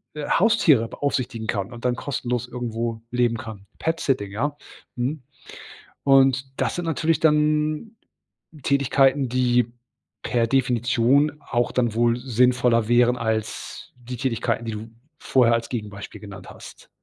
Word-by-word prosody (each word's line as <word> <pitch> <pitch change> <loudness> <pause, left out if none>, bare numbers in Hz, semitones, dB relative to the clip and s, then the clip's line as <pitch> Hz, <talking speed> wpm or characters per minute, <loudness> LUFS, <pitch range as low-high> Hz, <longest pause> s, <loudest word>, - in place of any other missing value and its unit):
äh, 150 - -7
äh, - - -5
Haustiere 165 - +4
beaufsichtigen 125 -5 -3
kann 100 +3 -2
und 120 - -11
dann 125 -1 +2
kostenlos 125 -2 -3
irgendwo 115 -2 -4
leben 120 -2 +1
kann. 110 -4 -9
Petsitting, 135 -10 -1
ja. 145 +8 -2 0.4
Mhm, 130 +3 -3 0.8
und 135 -1 +4
das - - -1
sind 175 - -3
natürlich 165 0 0
dann 150 +5 +1 0.7
Tätigkeiten, 140 0 +2
die 120 -1 +1 0.5
per 115 -1 +1
Definition 125 +2 +2
auch 120 0 -1
dann 120 -3 0
wohl 120 0 +2
sinnvoller 125 -2 +2
wären 120 +1 +4
als 110 -2 -4
die 125 0 -8
Tätigkeiten, 120 -2 -1
die 115 - -4
du 110 +2 -7 0.3
vorher 120 -3 +3
als 115 0 -1
Gegenbeispiel 105 -4 -7
genannt 100 -3 -10
hast. - - -13
125 Hz, 135 wpm, -23 LUFS, 115-135 Hz, 0.8 s, Haustiere